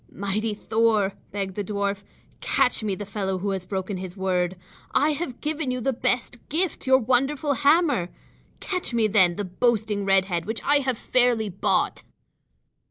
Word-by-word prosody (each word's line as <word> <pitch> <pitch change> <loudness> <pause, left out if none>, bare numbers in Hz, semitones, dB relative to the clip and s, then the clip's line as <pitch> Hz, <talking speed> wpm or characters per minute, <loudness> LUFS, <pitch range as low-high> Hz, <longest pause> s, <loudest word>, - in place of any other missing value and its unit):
"Mighty 210 +2 -2
Thor," 215 -2 +1 0.2
begged 195 -1 -3
the 205 - -3
dwarf, 200 0 -2 0.4
"catch 260 -4 +1
me 205 -3 -1
the 205 - -6
fellow 195 -2 -2
who 195 +2 -2
has 190 -2 -4
broken 190 0 -3
his 185 +1 -7
word. 185 -1 0 0.4
I 300 +2 +4
have 290 -4 -4
given 305 -2 -2
you 250 0 -1
the 265 +2 0
best 245 -1 -1
gift, 335 -1 -1
your 260 0 +7
wonderful 270 +4 +1
hammer. 285 - +3 0.5
Catch 365 -10 -2
me, 230 -2 +3
then, 190 -5 +4
the 205 - -3
boasting 215 +1 0
red 195 -1 +3
head 175 -2 -3
which 220 +1 -3
I 290 - +4
have 260 -4 -1
fairly 240 -4 +2
bought." 195 +1 0
215 Hz, 165 wpm, -25 LUFS, 195-260 Hz, 0.5 s, your